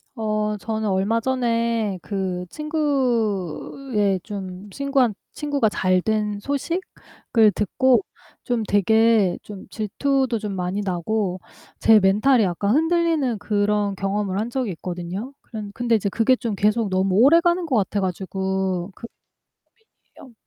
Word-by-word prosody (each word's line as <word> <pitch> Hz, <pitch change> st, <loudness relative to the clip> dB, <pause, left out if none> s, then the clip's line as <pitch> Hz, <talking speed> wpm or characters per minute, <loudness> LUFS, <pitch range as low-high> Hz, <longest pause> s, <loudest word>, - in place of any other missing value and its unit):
어 215 Hz, -2 st, -1 dB
저는 220 Hz, 0 st, -2 dB
얼마 195 Hz, +4 st, +1 dB
전에 230 Hz, -5 st, 0 dB
그 190 Hz, -3 st, -3 dB
친구의 245 Hz, -, -1 dB
좀 195 Hz, -1 st, -7 dB
친구한 275 Hz, -2 st, +1 dB, 0.2 s
친구가 285 Hz, -7 st, 0 dB
잘 185 Hz, -2 st, +1 dB
된 210 Hz, 0 st, -1 dB
소식을 280 Hz, -, -1 dB
듣고 260 Hz, -, +2 dB, 0.4 s
좀 240 Hz, -3 st, -1 dB
되게 215 Hz, -1 st, +3 dB
좀 205 Hz, -2 st, -10 dB
질투도 255 Hz, +3 st, -1 dB
좀 210 Hz, -2 st, -4 dB
많이 185 Hz, +2 st, -2 dB
나고 190 Hz, +1 st, -1 dB, 0.4 s
제 220 Hz, -1 st, +6 dB
멘탈이 215 Hz, +6 st, +4 dB
약간 200 Hz, +3 st, 0 dB
흔들리는 325 Hz, -6 st, +1 dB
그런 205 Hz, 0 st, 0 dB
경험을 195 Hz, 0 st, -2 dB
한 220 Hz, +3 st, -2 dB
적이 245 Hz, -4 st, -2 dB
있거든요. 180 Hz, +8 st, -6 dB
그런 210 Hz, -2 st, -8 dB
근데 240 Hz, 0 st, +1 dB
이제 205 Hz, -2 st, 0 dB
그게 230 Hz, +5 st, +3 dB
좀 230 Hz, -4 st, -3 dB
계속 210 Hz, +2 st, +1 dB
너무 185 Hz, 0 st, +1 dB
오래 275 Hz, -, +6 dB
가는 345 Hz, +1 st, +1 dB
것 290 Hz, -6 st, -1 dB
같아 205 Hz, 0 st, 0 dB
가지고 190 Hz, 0 st, -2 dB
그 -, -, -10 dB, 1.1 s
고민이에요. 255 Hz, -, -14 dB
215 Hz, 260 characters per minute, -22 LUFS, 195-245 Hz, 1.1 s, 제